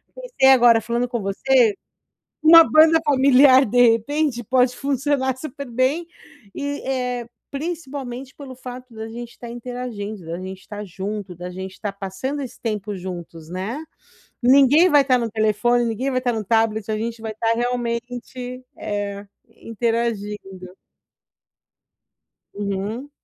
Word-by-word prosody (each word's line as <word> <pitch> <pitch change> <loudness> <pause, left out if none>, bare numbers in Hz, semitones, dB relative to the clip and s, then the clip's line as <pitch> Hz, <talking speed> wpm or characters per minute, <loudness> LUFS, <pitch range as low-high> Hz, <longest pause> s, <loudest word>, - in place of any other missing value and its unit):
pensei - - +2
agora 240 -3 +5
falando 235 +3 -1
com 240 -2 -3
você, 225 +4 +3 0.7
uma 330 +1 +10
banda 320 +1 +6
familiar 270 -1 +6
de 245 +1 +5
repente 240 +2 -1
pode 250 +1 +2
funcionar 275 -1 0
super 280 0 -7
bem 260 +8 0 0.5
e, 285 0 -4
eh, 250 -2 -2 0.2
principalmente 275 -4 -6
pelo 275 -3 -9
fato 250 0 -9
da 220 0 -6
gente 235 +1 -9
tá 240 - -8
interagindo, 235 -5 -6
da 165 +1 -4
gente 190 0 -9
tá 210 0 -6
junto, 195 +1 -6
da 175 +1 -7
gente 190 +1 -8
tá 210 - -2
passando 200 +9 -4
esse 255 -2 -9
tempo 210 -2 -3
juntos, 175 -3 -8
né, 200 - -4 0.6
ninguém 280 +7 +6
vai 290 -3 +5
tá 255 -1 +4
no 230 -2 -3
telefone, 220 +3 +2
ninguém 250 +4 -2
vai 255 - +1
tá 245 -1 0
no 220 -1 -3
tablet, 220 -1 +1
a 215 - -1
gente 230 +1 -4
vai 220 -1 -5
tá 225 +1 +1
realmente, 245 +1 -4 0.2
eh, 205 -1 -4 0.4
interagindo. 210 -5 -3 1.8
Uhum. 205 +6 -4
240 Hz, 135 wpm, -22 LUFS, 210-265 Hz, 1.8 s, uma